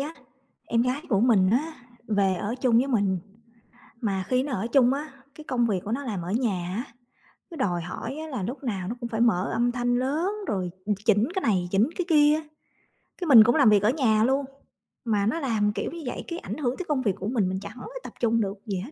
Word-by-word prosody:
á, 300 +4 -4 0.5
em 230 0 +1
gái 255 +4 -1
của 200 -4 +2
mình 210 -6 +4
á, 300 +8 +1 0.4
về 200 -3 +2
ở 205 +5 -3
chung 250 -3 +3
với 260 - +2
mình. 200 -7 +1 0.8
Mà 195 -4 -1
khi 255 0 +2
nó 285 - -5
ở 205 +2 -2
chung 250 +1 +4
á, 295 +2 -5 0.2
cái 310 - -10
công 245 -5 0
việc 200 -4 0
của 210 - -5
nó 270 +5 -2
làm 210 -9 -3
ở 175 +2 -5
nhà 195 -7 -1
á, 235 - -2 0.7
cứ 335 - -8
đòi 180 - 0
hỏi 180 - -6
á 315 0 -6
là 260 -10 -4
lúc 255 +8 -5
nào 195 -8 -3
nó 230 - -3
cũng 235 - -4
phải 225 -1 -2
mở 195 -6 +2
âm 240 +1 +1
thanh 245 0 0
lớn, 300 +9 0 0.2
rồi 185 -3 -2 0.3
chỉnh 215 +1 +4
cái 380 - 0
này 185 - +1
chỉnh 205 +7 +3
cái 360 - -1
kia 300 -2 +5
á. 315 - -4 0.7
Cái 355 - -4
mình 240 -7 +10
cũng 240 +2 +3
làm 280 -7 +6
việc 210 -2 +5
ở 210 - +4
nhà 230 -6 +2
luôn, 270 +3 +1 0.6
mà 210 -3 +1
nó 230 +10 0
làm 220 -8 +1
kiểu - - -3
như 340 - -7
vậy 245 - -4
cái 340 0 -4
ảnh - - -6
hưởng 260 -4 -1
tới 370 - -5
công 285 -3 +1
việc 205 -7 0
của 195 - -5
mình, 215 -6 +1
mình 190 0 -2
chẳng - - -9
có - - -8 0.2
tập - - -9
trung 230 -1 +2
được 200 -1 -3
gì 200 -4 -2
hết. 220 +11 -7
235 Hz, 245 wpm, -26 LUFS, 200-270 Hz, 0.8 s, mình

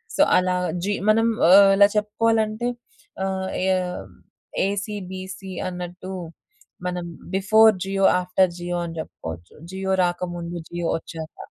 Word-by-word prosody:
So, - - +2 0.2
అలా 185 0 +1 0.3
G 205 - 0 0.2
మనం 225 +1 +4 0.2
ఆహ్, 195 +1 +8
ఇలా 200 0 +8
చెప్పుకోవాలంటే 220 +2 +1 0.6
ఆహ్, 190 0 -2 0.2
ఏ - - +1 1.0
ఏసీ 205 +1 -3 0.2
బీసీ 190 0 -7 0.2
అన్నట్టు. 180 +1 -7 0.7
మనం 180 -1 -3 0.3
బిఫోర్ 220 +3 +6
జియో 195 0 0 0.2
ఆఫ్టర్ 180 0 +2
జియో 175 0 -3
అని 165 0 -7
చెప్పుకోవచ్చు. 85 - -8 0.2
జియో 190 0 -2
రాకముందు. 175 -1 -3
జియో 175 -1 -3
వచ్చాక. 160 -1 -9
190 Hz, 120 wpm, -23 LUFS, 175-205 Hz, 1.0 s, ఆహ్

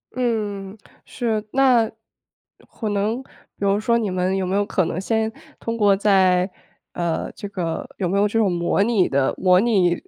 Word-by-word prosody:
嗯， 210 -5 -2 0.3
是。 225 -4 -2
那 255 -5 +4 0.8
可 220 - -5
能 210 +5 -1
比 - - -26 0.3
如 200 0 +2
说 235 +2 +2
你 210 -5 -1
们 185 +1 0
有 190 - -1
没 185 +2 -1
有 205 - +2
可 185 -4 0
能 170 +2 -3
先 220 +2 0 0.3
通 230 - -3
过 205 -3 +4
在， 190 -2 +3 0.4
呃， 170 -2 -2
这 205 - -8
个 180 - -3
有 185 - -1
没 190 +3 0
有 205 +1 +3
这 220 +2 -2
种 210 -4 +3
模 175 +3 +1
拟 210 -4 +2
的， 135 -1 +1
模 185 -1 +4
拟， 195 -6 +3
200 Hz, 190 characters per minute, -22 LUFS, 185-225 Hz, 0.8 s, 那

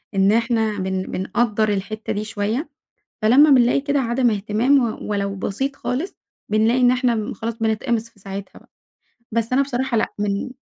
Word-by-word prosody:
إن 195 +1 +4
إحنا 225 -2 +1
بن 190 0 -1
بنقدَّر 215 +3 0
الحتّة 210 +2 -3
دي 210 +1 -2
شوية، 215 +8 -2 0.5
فلمّا 270 +8 +6
بنلاقي 250 0 +5
كده 285 0 0
عدم 240 0 +1
اهتمام 220 +7 +2 0.2
و - - -6
ولو 200 -1 -1
بسيط 270 +9 -3
خالص 290 +10 -3 0.3
بنلاقي 220 +4 +2
إن 245 0 +5
إحنا 240 -4 0
خلاص 225 +3 -5
بنتقمص 225 +1 -1
في 230 - -27
ساعتها 195 0 -8
بقى، - - -25 0.6
بس 230 +2 -1
أنا 270 - +4
بصراحة 265 -2 -1
لأ 220 - +2
من 205 +4 -1
225 Hz, 165 wpm, -21 LUFS, 210-250 Hz, 0.6 s, فلمّا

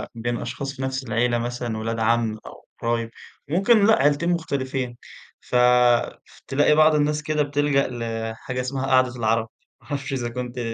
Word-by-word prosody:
بين 120 +1 -2
أشخاص 140 0 -5
في 130 - -8
نفس 130 0 -2
العيلة 120 +1 0
مثلًا 120 -1 -3
ولاد 115 +1 -3
عم 115 -1 +1
أو - - -12
قرايب 115 -1 -1 0.4
وممكن 200 +5 +4
لأ، 220 - +6
عيلتين 145 +4 +2
مختلفين 130 -7 -2 0.4
ف - - -6 0.7
ف - - -20
تلاقي 145 +2 +3
بعض 155 0 +5
الناس 150 0 +1
كده 150 -1 0
بتلجأ 145 -1 +1
لحاجة 115 +1 -4
اسمها 130 +1 -3
قاعدة 130 -1 +3
العَرب 115 -1 0 0.3
ما - - -21
اعرفش 135 -2 -4
إذا 120 -3 -2
كنتِ 125 0 -5
130 Hz, 160 wpm, -23 LUFS, 115-145 Hz, 0.7 s, لأ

